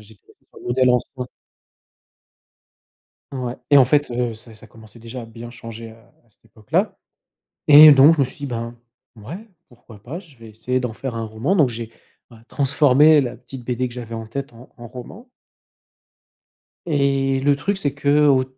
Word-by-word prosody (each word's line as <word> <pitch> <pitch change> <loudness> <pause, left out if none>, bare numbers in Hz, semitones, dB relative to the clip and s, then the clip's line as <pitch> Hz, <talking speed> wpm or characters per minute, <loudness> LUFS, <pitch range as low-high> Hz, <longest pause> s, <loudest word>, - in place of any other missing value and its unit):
j'étais 105 -1 -19
resté - - -26
sur - - -16
le - - -12
modèle 125 +1 +2
ancien. 125 +1 -2 2.1
Ouais, 125 -2 -4 0.2
et 145 - +7
en 130 - +7
fait, 145 0 +1
heu, 120 -1 -2
ça 110 0 -16
ça 110 - -16
commençait 110 +1 -17
déjà 115 +2 -9
à - - -9
bien 115 +1 -11
changer 115 -1 -10
à - - -17
à 120 - -31
cette - - -33
époque-là. 110 -1 -3 0.7
Et 150 +1 +10
donc 145 +4 +6
je - - -7
me 140 - +3
suis 130 - -14
dit, 140 - -5
ben, 115 -2 -5 0.4
ouais, 115 - -9 0.3
pourquoi 115 -3 -17
pas, 150 +8 -7
je 165 -7 -19
vais 115 -2 -14
essayer 125 +4 -3
d'en 125 - -3
faire 125 0 -6
un 115 - -4
roman 110 - -2
donc 150 -8 +3
j'ai, 115 -1 -7 0.4
ouais, 115 - -15
transformé 145 +1 +4
la 125 - -5
petite 130 -2 -11
BD 125 +1 -2
que 120 - -12
j'avais 115 -2 -7
en 115 -1 -7
tête 140 +4 -6
en 120 +2 -16
en 120 -1 -11
roman 205 - -11 1.6
et 135 -3 0
le 140 +1 +2
truc 195 +7 -2
c'est 145 -7 -2
qu'au 140 -2 +3
125 Hz, 185 wpm, -20 LUFS, 115-140 Hz, 2.1 s, Et